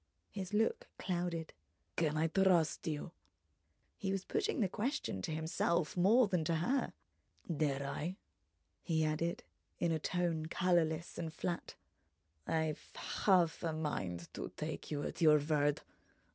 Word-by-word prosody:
His 190 -2 -5
look 460 - +1
clouded. 175 -3 -2 0.4
"Can 155 -2 +1
I 160 - +3
trust 175 -2 +3
you?" 155 +1 -3 0.8
He 195 - -2
was 195 -1 -2
putting 430 -6 0
the 205 - +3
question 220 - -2
to 160 - -3
himself 160 +1 0
more 210 +7 +5
than 180 -4 +1
to 165 - +2
her. 245 +12 +1 0.6
"Dare 140 -2 0
I?" 160 +6 -3 0.6
He 160 -2 +1
added 160 +3 -1 0.3
in 170 - +1
a 160 - +1
tone 165 -1 0
colourless 170 -2 +1
and 165 -2 -3
flat: 170 +2 -3 0.7
"I've 160 -2 -1
half 180 -5 +2
a 165 -2 -1
mind 95 - -3
to - - -4
take - - -4
you 145 -1 -2
at - - -5
your 155 -2 +8
word. 145 -1 +1
165 Hz, 140 wpm, -35 LUFS, 155-185 Hz, 0.8 s, your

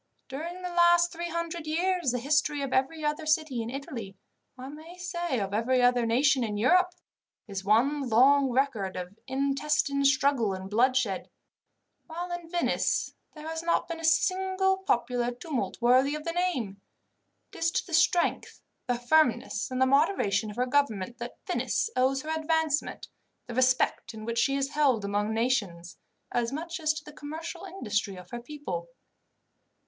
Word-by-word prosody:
During 335 +7 -6
the 360 - -3
last 345 0 +5
three 345 0 -5
hundred 335 -1 -4
years, 350 -1 +1
the 250 - 0
history 290 +2 +1
of 270 - -3
every 300 +4 0
other 300 +1 -2
city 305 -6 +1
in 225 - -4
Italy, 235 -7 -6 0.4
I 255 +1 -8
may 315 +5 -11
say 345 -7 -2
of 195 -1 -3
every 240 +4 +2
other 245 -1 +3
nation 260 +3 +3
in 210 -2 -2
Europe, 360 - +3 0.5
is 195 -2 -5
one 255 +7 +2
long 270 +4 +5
record 245 -7 0
of 180 +2 -6
intestine 280 +1 0
struggle 270 -6 +3
and 190 +1 -8
bloodshed, 240 -3 +1 0.8
while 345 +2 -5
in 350 -1 -6
Venice 345 0 0 0.2
there 305 0 -9
has 320 0 -3
not 340 +1 0
been 335 -1 -5
a - - -9
single 380 +3 +2
popular 245 -9 0
tumult 255 +3 -4
worthy 255 +4 +4
of 305 - -6
the 335 - -2
name. 265 - -2 0.7
It - - -10
is 330 0 +2
to - - -1
the 345 - -10
strength, 340 +2 +2 0.3
the 245 - +1
firmness, 245 -1 +2
and 255 0 -3
the 260 - +5
moderation 260 - +2
of 210 - -8
her 250 +1 +1
government 240 -5 0
that 240 0 -7
Venice 455 - -1
owes 265 +1 +2
her 310 - -7
advancement, 315 -1 -1 0.4
the 240 - -7
respect 255 -2 +1
in 215 0 -8
which 230 0 -1
she 275 - +2
is 275 0 0
held 270 -8 +2
among 205 +2 -1
nations, 210 -7 -1 0.3
as 240 0 0
much 335 +5 -5
as 310 -1 +2
to 305 - -6
the 300 - -12
commercial 320 +5 -7
industry 210 - -2
of 180 -1 -12
her 240 0 -5
people. 235 - -6
275 Hz, 170 wpm, -28 LUFS, 235-325 Hz, 0.8 s, last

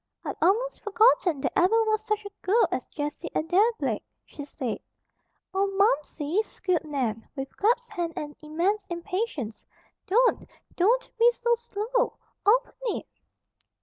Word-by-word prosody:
"I'd - - -3
almost 450 +9 +2
forgotten 410 - +3
there - - 0
ever 445 +6 +4
was 435 -1 +1
such 425 -1 -1
a 405 - -7
girl 440 +6 +3
as - - -2
Jessie 295 0 -4
Adair 370 +9 +3
Blake," - - -1 0.2
she 290 - -9
said. 250 -5 -4 0.7
"Oh, 390 +1 +2
Momsey!" 310 -1 +2
squealed 365 -6 -2
Nan, 250 -7 -2
with 270 -1 -6
clasped 475 +3 +1
hands 340 -1 -2
and 295 -1 -5
immense 350 +7 -1
impatience. 345 - -3 0.4
"Don't, 480 +6 +3 0.3
DON'T 460 +8 +2
be 475 +1 +7
so 475 0 +1
slow! 470 +1 -1 0.3
Open - - +4 0.2
it!" - - -8
390 Hz, 140 wpm, -27 LUFS, 310-455 Hz, 0.7 s, be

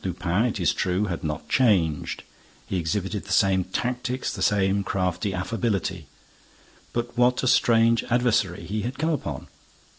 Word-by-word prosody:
Lupin, 90 +3 0
it 115 -4 -2
is 85 - +2
true, 90 +3 0
had 90 -4 -4
not 75 -1 -4
changed; 90 - +1 0.4
he 95 - -2
exhibited 95 +4 -2
the 100 - -8
same 95 -1 +3
tactics, 125 +5 -2
the - - -6
same 100 -1 +2
crafty 90 0 -1
affability. 95 - -2 0.8
But 120 0 -3
what 125 +1 +3
a - - +1
strange 115 -1 +4
adversary 115 -8 +1
he 105 +4 -3
had 125 +5 -4
come 160 +3 0
upon! 75 - -4
100 Hz, 150 wpm, -25 LUFS, 90-120 Hz, 0.8 s, strange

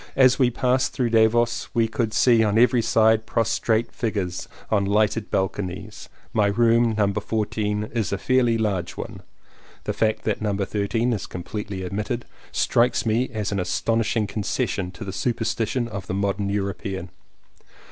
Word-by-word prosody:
As 130 -2 +5
we 125 -2 +5
passed 125 +1 +1
through 120 -3 0
Davos 115 +1 +3
we 115 -1 +3
could 110 0 -1
see 115 0 +4
on 105 0 +1
every 125 +1 +5
side 110 0 +3
prostrate 115 0 +1
figures 100 -6 -3 0.2
on 105 -2 +3
lighted 105 +2 +1
balconies. 95 -1 -3 0.2
My 105 -2 +3
room, 115 +2 +3
No. 105 -2 +3
14, 105 0 -1
is 115 -4 -1
a 100 - 0
fairly 125 0 +2
large 100 -6 -2
one. - - -7 0.6
(The - - -2
fact 110 -1 0
that 110 -1 -1
No. 105 -2 0
13 105 +4 0
is 105 - -4
completely 95 +1 -5
omitted 105 +6 -3 0.3
strikes 120 +1 +2
me 115 +3 +1
as 105 -4 -3
an 100 - -1
astonishing 110 +4 0
concession 100 -2 -2
to 105 +4 -9
the 95 - -5
superstition 120 +1 -1
of 100 -5 -7
the 95 - -2
modern 100 0 -1
European.) 100 -2 -3
110 Hz, 155 wpm, -24 LUFS, 100-115 Hz, 0.6 s, As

